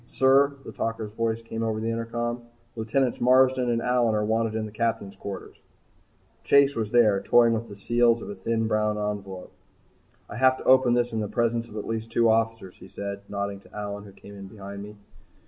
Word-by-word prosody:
"Sir," 140 +2 +4
the - - -7
talker's 115 -2 -4
voice 115 +1 -2
came 115 0 -5
over 110 -1 -1
the 115 +1 -2
intercom, 120 +1 -3 0.3
"Lieutenants 120 +3 -1
Marsden 130 0 +4
and 115 -1 0
Allyn 120 -3 +2
are 105 0 0
wanted 110 0 0
in 110 -1 -2
the 105 - -8
Captain's 110 -3 -2
quarters." 100 -1 -8 0.9
Chase 140 0 +4
was 110 -2 -2
there 110 -4 +4
toying 120 -1 +4
with 115 +1 -3
the 100 - -9
seals 120 +3 +2
of - - -8
a - - -5
thin, 115 +4 -1
brown 105 -1 0
envelope. 100 -3 -5 0.8
"I - - -8
have 130 +1 +4
to - - -9
open 130 -2 +5
this 120 -1 0
in 110 - -1
the 105 - -2
presence 115 +1 0
of 110 - -10
at 105 - -4
least 115 0 -4
two 115 -1 +3
officers," 115 -4 -1
he 90 - -13
said 100 +1 -6
nodding 100 -1 -4
at - - -20
Allyn 105 0 -6
who 100 - -12
came 100 +1 -14
in 100 -1 -9
behind 100 0 -9
me. 105 +1 -9
115 Hz, 205 wpm, -26 LUFS, 105-120 Hz, 0.9 s, open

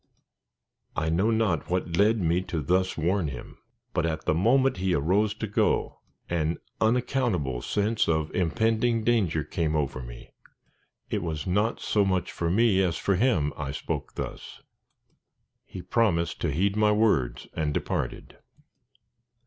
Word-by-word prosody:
_" - - -51 0.9
I 80 - 0
know 95 +7 +2
not 110 -9 0
what 90 -1 -1
led 105 +5 +4
me 85 0 +1
to 80 -3 -3
thus 95 +5 +1
warn 85 +2 +1
him; 65 -4 -8 0.3
but 85 - +1
at 80 -1 -2
the - - +2
moment 125 - +3
he 90 0 +1
arose 100 +8 +1
to 110 - -4
go, 105 - 0 0.3
an 85 -1 -1 0.2
unaccountable 110 - 0
sense 105 0 0
of 80 -1 0
impending 115 +5 +1
danger 100 -10 +1
came 80 +1 -1
over 70 -3 -1
me. - - -11 0.8
It - - 0
was 80 -3 -4
not 105 +5 0
so 105 - +1
much 95 -2 0
for 85 - -2
me 100 0 +3
as 90 -3 0
for 100 - 0
him 90 - +2
I 70 -2 -4
spoke 75 - -5
thus. - - -7 1.0
He 90 - -8
promised 85 -8 +1
to 85 - 0
heed 95 +7 +1
my 105 0 +3
words 100 - +1
and 75 -2 -1
departed. - - -3
90 Hz, 150 wpm, -27 LUFS, 80-110 Hz, 1.0 s, led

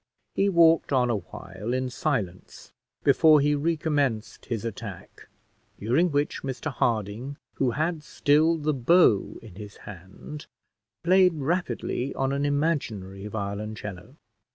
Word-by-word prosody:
He 200 - +2
walked 165 -4 +4
on 125 -3 +3
awhile 105 +2 -5
in 130 0 -2
silence 105 - -3 0.3
before 155 -2 +6
he 145 +1 +2
recommenced 145 -6 -1
his 115 -3 -3
attack, 105 -3 -8 0.5
during 130 - +2
which 145 +1 -1
Mr 135 +3 -4
Harding, 115 +4 -1 0.2
who 130 - +2
had 160 +1 -1
still 155 +2 +2
the 155 0 0
bow 130 - +3
in 110 -5 -12
his 105 -1 -10
hand, 100 - -10 0.6
played 185 0 +5
rapidly 150 -3 -2
on 135 0 0
an 140 +1 0
imaginary 120 - -2
violoncello. 105 +1 -6
135 Hz, 120 wpm, -26 LUFS, 105-155 Hz, 0.6 s, before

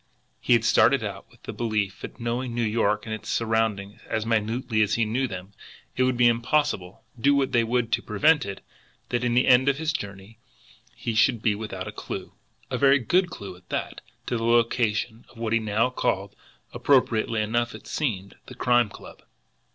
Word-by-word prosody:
He - - +2
had - - +3
started - - +4
out - - -6
with - - -24
the - - -6
belief 110 -4 -2
that, - - -9
knowing 120 +1 -3
New 120 - 0
York 105 -1 +1
and 110 - -4
its 110 0 -7
surroundings 110 -3 -1
as 110 0 -2
minutely 115 +1 0
as 105 0 +2
he 115 - +1
knew 125 +5 0
them, 95 -1 -8 0.4
it - - -1
would 130 -1 +2
be 120 - +4
impossible, 120 -5 0 0.2
do 140 +4 +4
what 135 -1 +1
they 120 - +3
would 115 0 0
to 115 - +1
prevent 145 +9 +3
it, 100 -1 -7 0.4
that 120 0 -1
at 125 - +1
the 125 +2 +3
end 130 +2 +5
of 140 - +1
the 160 - -5
journey 100 -7 -5 0.6
he 115 - -3
should 115 +1 +2
be 110 - +3
without 100 -3 -6
a - - -5
clew, - - -7 0.4
and - - 0
a - - -7
very 140 0 +6
good 175 +9 +1
clew 100 - -8
at 90 0 -21
that, - - -4 0.2
to 120 - -1
the 115 - -4
location 115 -1 +1
of - - -19
what 115 -1 -2
he 115 - +4
now 110 +3 0
called, 100 -5 -2 0.4
appropriately 115 -5 +2
enough 115 +2 -1
it - - -12
seemed, 100 -10 -3
the 125 - -10
Crime 120 -2 +3
Club. - - -13
115 Hz, 200 wpm, -25 LUFS, 105-125 Hz, 0.6 s, very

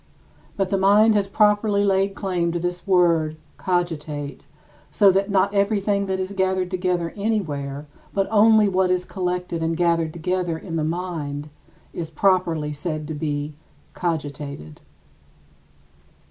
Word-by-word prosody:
But 195 -2 0
the 195 -1 +1
mind 210 +3 +5
has 205 -2 +1
properly 205 0 +2
laid 195 0 +1
claim 180 -4 -1
to 175 - -1
this 175 +2 -4
word 170 -4 +3 0.2
[cogitate] 155 -5 -2 0.5
so 200 -2 +5
that 195 +2 0
not 200 0 +2
everything 200 0 +1
that 190 0 -1
is 190 +1 -3
gathered 190 -1 0
together 180 -2 -1
anywhere, 150 -10 -2 0.3
but 195 -1 0
only 220 0 +5
what 190 -1 +1
is 180 0 0
collected 180 -2 -3
and 165 0 -1
gathered 170 -2 +1
together 175 0 -2
in 165 0 -7
the 160 - 0
mind, 155 -3 -4 0.4
is 165 -2 -5
properly 165 -3 +1
said 155 0 -4
to - - -3
be 150 0 -3 0.4
"cogitated." 145 - -4
180 Hz, 135 wpm, -23 LUFS, 160-195 Hz, 0.5 s, mind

